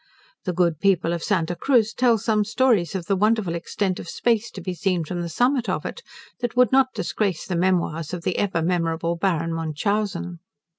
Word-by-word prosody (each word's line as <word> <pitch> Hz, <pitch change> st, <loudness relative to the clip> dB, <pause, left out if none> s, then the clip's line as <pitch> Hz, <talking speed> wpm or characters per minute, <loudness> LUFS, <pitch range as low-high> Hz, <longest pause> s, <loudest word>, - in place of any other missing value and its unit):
The 180 Hz, -, -1 dB
good 170 Hz, -3 st, +1 dB
people 180 Hz, -3 st, +2 dB
of 170 Hz, -, -3 dB
Santa 175 Hz, -4 st, 0 dB
Cruz 230 Hz, -1 st, +2 dB
tell 240 Hz, -2 st, +3 dB
some 215 Hz, 0 st, +1 dB
stories 220 Hz, -, +2 dB
of 180 Hz, -3 st, -3 dB
the 195 Hz, -, +1 dB
wonderful 210 Hz, -2 st, +1 dB
extent 185 Hz, +2 st, -2 dB
of 170 Hz, -, -8 dB
space 235 Hz, -1 st, 0 dB
to -, -, -9 dB
be 185 Hz, 0 st, -4 dB
seen 180 Hz, -2 st, -1 dB
from 175 Hz, +2 st, -4 dB
the 170 Hz, -, -4 dB
summit 245 Hz, -, +1 dB
of -, -, -2 dB
it, 480 Hz, -, -5 dB, 0.4 s
that 245 Hz, 0 st, -3 dB
would 250 Hz, -3 st, +5 dB
not 260 Hz, -1 st, +3 dB
disgrace 195 Hz, -6 st, -1 dB
the 185 Hz, -, -3 dB
memoirs 170 Hz, -3 st, 0 dB
of 180 Hz, -2 st, -5 dB
the 180 Hz, -, -1 dB
ever 185 Hz, -5 st, 0 dB
memorable 170 Hz, -1 st, 0 dB
Baron 165 Hz, -2 st, 0 dB
Munchausen. 175 Hz, +3 st, -2 dB
185 Hz, 195 wpm, -23 LUFS, 170-215 Hz, 0.4 s, would